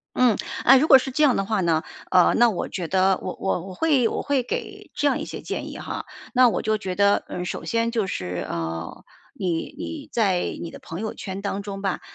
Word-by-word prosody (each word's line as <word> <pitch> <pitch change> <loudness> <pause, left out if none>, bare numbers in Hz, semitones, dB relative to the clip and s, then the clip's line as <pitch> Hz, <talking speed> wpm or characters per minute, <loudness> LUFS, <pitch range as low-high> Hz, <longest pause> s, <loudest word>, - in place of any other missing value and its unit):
嗯。 245 -4 +4 0.3
哎， 270 - +8
如 305 +4 +2
果 270 - +10
是 265 - -4
这 300 +4 0
样 280 -4 +5
的 195 - 0
话 210 0 0
呢， 165 -3 +2 0.3
呃， 180 -1 +5
那 240 0 +5
我 190 - -3
觉 175 -4 -4
得 190 +1 +3
我 185 - -5
我 190 - 0
我 185 - -8
会 280 - +3
我 - - -3
会 280 -2 +1
给 245 - -5
这 295 - 0
样 285 - +2
一 - - -3
些 - - -7
建 - - -5
议 - - -8
哈。 - - -5 0.3
那 250 -1 +7
我 200 - -1
就 215 0 +1
觉 190 -3 -4
得， 200 0 +3
嗯， 180 - -4
首 - - -5
先 230 0 0
就 225 -4 0
是， 90 - -3
呃， 80 0 -4 0.3
你 175 -3 -2
你 305 -3 -6
在 195 -6 +2 0.2
你 170 - -5
的 - - -9
朋 165 +3 -7
友 220 0 -3
圈 190 -1 -6
当 200 0 -2
中 195 -1 -6
吧， 195 -2 -1
200 Hz, 250 characters per minute, -24 LUFS, 180-240 Hz, 0.3 s, 果